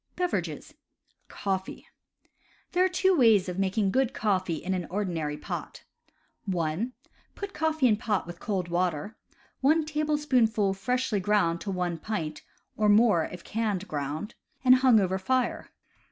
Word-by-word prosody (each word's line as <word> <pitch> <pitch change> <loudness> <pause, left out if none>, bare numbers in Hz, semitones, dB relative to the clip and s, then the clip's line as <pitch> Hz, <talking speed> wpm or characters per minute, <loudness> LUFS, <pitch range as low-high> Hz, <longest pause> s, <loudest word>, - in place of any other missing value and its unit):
BEVERAGES 360 -1 -3 0.5
Coffee. 190 -1 -4 0.4
— - - -37
There 360 0 +3
are 375 - +3
two 375 +1 +2
ways 225 - +5
of 180 +1 -4
making 195 +1 +1
good 265 +2 +1
coffee 185 -5 0
in 180 +4 -3
an 180 -3 -3
ordinary 170 -7 -2
pot. - - -6 0.6
(1) 180 +5 -1 0.4
Put 405 -1 -6
coffee 315 -5 +2
in 215 -3 +3
pot 215 -3 -1
with 175 0 -9
cold 190 -4 -2
water 175 +2 -1 0.4
(one 310 +4 +3
tablespoonful 285 -9 +1
freshly 250 +1 -1
ground 180 -4 +1
to 205 - -5
one 180 -3 -2
pint, 160 -6 -4 0.3
or 210 -1 +2
more 205 -6 +5
if 180 -1 -9
canned 210 -3 -2
ground) 150 +8 -4 0.3
and 255 0 +8
hang 255 -4 +5
over 190 -1 0
fire. 255 +5 -1
205 Hz, 145 wpm, -28 LUFS, 180-255 Hz, 0.6 s, and